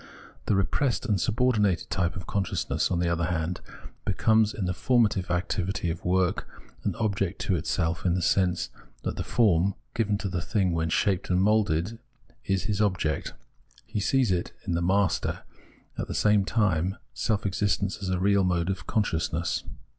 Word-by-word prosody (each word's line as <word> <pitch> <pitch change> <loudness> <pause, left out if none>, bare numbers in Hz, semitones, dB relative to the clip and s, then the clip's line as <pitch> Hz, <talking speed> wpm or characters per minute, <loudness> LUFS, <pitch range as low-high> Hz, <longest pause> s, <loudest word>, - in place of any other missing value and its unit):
The 105 - +3
re 95 - +3
pressed 130 +1 0
and 105 -6 +1
subordinated 110 -6 +1
type 90 -1 0
of 90 -1 -6
consciousness, 95 -1 -1
on 90 - 0
the 85 0 +1
other 85 0 +1
hand, 85 0 -2 0.4
becomes, 110 -1 +3
in 100 - -3
the 90 - 0
formative 110 -4 +2
activity 90 0 -1
of 85 - -6
work, 90 0 +1 0.4
an - - -1
object 100 -4 -1
to 95 - +1
itself, 80 +1 -1
in 90 -2 +2
the 90 - 0
sense 90 0 +1 0.3
that - - -2
the - - -3
form, 100 -4 +2 0.2
given 105 -3 +1
to 100 - -3
the 90 -2 -2
thing 95 -3 +1
when 80 -1 0
shaped 95 +3 +1
and 90 0 +3
moulded, 105 -1 +1 0.4
is 95 -1 0
his 105 -1 -1
object; 90 -7 0 0.5
he - - -3
sees 125 +1 +2
in 90 -1 0 0.2
the 85 - 0
master, 95 +1 +1 0.6
at - - -2
the - - -4
same 105 -2 +3
time, 95 -3 +1 0.2
self 105 -4 -1
existence 100 0 0
as 95 - -3
a 95 - +1
real 100 +1 +3
mode 90 0 +1
of 95 - -6
consciousness. 85 -5 -1
95 Hz, 170 wpm, -27 LUFS, 85-105 Hz, 0.6 s, The